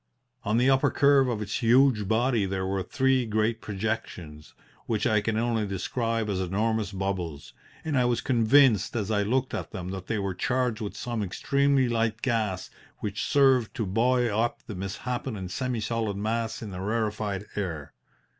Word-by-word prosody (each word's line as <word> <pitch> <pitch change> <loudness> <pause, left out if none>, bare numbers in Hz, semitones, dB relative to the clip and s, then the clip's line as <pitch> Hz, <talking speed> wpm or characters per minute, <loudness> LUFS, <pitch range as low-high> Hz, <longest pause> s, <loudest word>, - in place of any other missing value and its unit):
On 105 +2 +1
the 125 +2 +3
upper 135 0 +4
curve 140 -2 +4
of 110 -4 -2
its 105 +5 -3
huge 120 -3 +4
body 115 -1 +2
there 95 0 -2
were 95 0 -1
three 130 +6 +1
great 110 +1 0
projections 95 -7 -5 0.3
which 110 -3 0
I 110 -3 +3
can 110 +1 -1
only 115 -2 0
describe 115 +3 -2
as 100 -3 -1
enormous 105 +4 0
bubbles, 95 -6 -4 0.3
and 155 -2 -1
I 125 -2 +3
was 120 -1 +1
convinced 120 -3 +4
as 110 -2 -1
I 105 -1 +2
looked 130 +5 0
at - - -4
them 90 -4 -6
that 95 -1 -6
they 110 - -1
were 100 -2 -2
charged 125 +3 -1
with 105 - -5
some 120 -3 -3
extremely 140 +7 +1
light 115 -2 -1
gas 110 -8 -1 0.3
which 105 -1 -3
served 135 -5 +3
to 115 - -1
buoy 120 +5 +2
up 115 +2 -1
the 110 - -7
misshapen 110 +6 -4
and 95 -2 -6
semi 125 +2 -2
solid 110 -2 -2
mass 110 +2 -2
in 105 - -6
the 90 0 -6
rarefied 105 -1 -2
air. 85 -8 -4
110 Hz, 175 wpm, -27 LUFS, 100-120 Hz, 0.3 s, upper